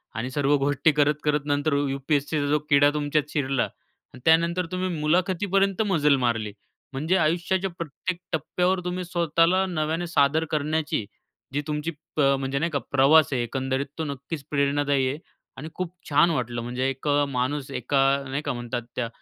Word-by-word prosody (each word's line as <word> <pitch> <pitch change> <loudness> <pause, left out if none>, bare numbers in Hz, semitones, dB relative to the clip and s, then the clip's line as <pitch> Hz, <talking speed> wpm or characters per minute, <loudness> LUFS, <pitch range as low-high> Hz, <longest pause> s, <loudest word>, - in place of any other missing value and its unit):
आणि 115 +4 -3
सर्व 145 +1 +2
गोष्टी 145 +3 +2
करत-करत 150 0 +1
नंतर 145 +1 0 0.2
यू-पी-एस-सीचा 145 +2 -1
जो 150 +1 +2
किडा 145 -1 +6
तुमच्यात 150 0 0
शिरला 135 -3 +1
आणि 130 - -13
त्यानंतर 170 +2 +3
तुम्ही 185 0 -1
मुलाखतीपर्यंत 185 +5 +1
मजल 150 -5 +4
मारली. 115 -3 0 0.4
म्हणजे 155 +8 +1
आयुष्याच्या 175 +4 +1
प्रत्येक 170 +3 -4
टप्प्यावर 180 +4 0
तुम्ही 180 +1 -2
स्वतःला 170 +2 +2
नव्याने 165 -1 -2
सादर 160 -1 +2
करण्याची 155 -5 -1 0.5
जी 145 - 0
तुमची 150 +2 -2 0.2
प 155 - +1 0.2
म्हणजे 135 0 -2
नाही 170 +3 -1
का, 140 - 0
प्रवास 140 +3 +5
आहे 125 - 0
एकंदरीत, 130 +3 -2
तो 160 - -2
नक्कीच 140 +1 -6
प्रेरणादायी 140 -1 +1
आहे 140 - -3 0.4
आणि 150 +4 -7
खूप 185 -1 -4 0.2
छान 150 +3 +5
वाटलं. 120 -5 -2
म्हणजे 125 +2 -2
एक 135 +2 -6 0.2
माणूस 135 +2 -2
एका 135 +2 0 0.3
नाही 135 +2 -2
का 145 - -1
म्हणतात 120 0 -4
त्या 120 - -1
145 Hz, 155 wpm, -25 LUFS, 135-165 Hz, 0.5 s, किडा